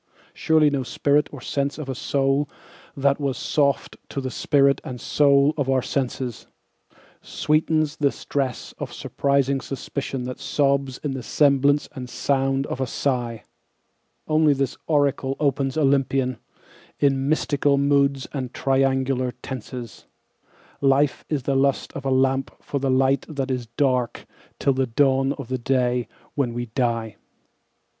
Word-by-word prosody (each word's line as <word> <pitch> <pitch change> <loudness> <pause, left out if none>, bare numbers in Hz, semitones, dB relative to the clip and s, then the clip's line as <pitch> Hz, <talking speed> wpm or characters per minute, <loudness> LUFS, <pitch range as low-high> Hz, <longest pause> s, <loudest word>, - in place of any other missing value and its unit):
Surely 155 -2 +3
no 140 -2 0
spirit 145 +3 +1
or 145 - -8
sense 140 +3 -2
of 155 -3 -6
a 135 - -2
soul 135 +2 0 0.5
that 140 +1 +2
was 135 -2 -1
soft 140 -5 0
to - - -3
the 130 -1 -4
spirit 140 +1 +3
and 125 -1 -6
soul 140 +2 +4
of 140 -3 -1
our 130 -2 +2
senses 130 -3 -3 0.7
Sweetens 155 0 0
the 140 -2 +2
stress 135 -4 -3
of - - -5
suspiring 140 -1 0
suspicion 135 -1 -4
that 125 0 -6
sobs 140 -2 0
in 145 - -1
the 135 -1 -4
semblance 145 +2 +3
and 125 -4 -7
sound 135 +1 0
of 135 - -4
a 130 - 0
sigh; 120 -4 -2 0.8
Only 155 -1 +4
this 135 0 -1
oracle 140 -3 +1
opens 140 -1 0
Olympian, 135 -3 +1 0.6
in 135 -1 +2
mystical 145 -2 +2
moods 140 -1 +2
and 130 -3 -4
triangular 135 -1 +1
tenses 125 -3 -7 0.7
"Life 140 +1 +2
is 145 -4 -1
the 140 - 0
lust 135 0 +1
of 140 - -7
a - - +1
lamp 135 0 +2
for 140 - -3
the 135 0 -1
light 130 +1 +3
that 135 -3 -3
is 125 -2 -3
dark 125 -4 +1 0.3
till 140 - +2
the 130 0 0
dawn 135 +2 +2
of 140 -4 -8
the 130 +1 -2
day 125 -1 +1 0.3
when 125 -5 -1
we 120 0 -2
die." 115 -2 -2
135 Hz, 145 wpm, -23 LUFS, 130-140 Hz, 0.8 s, soul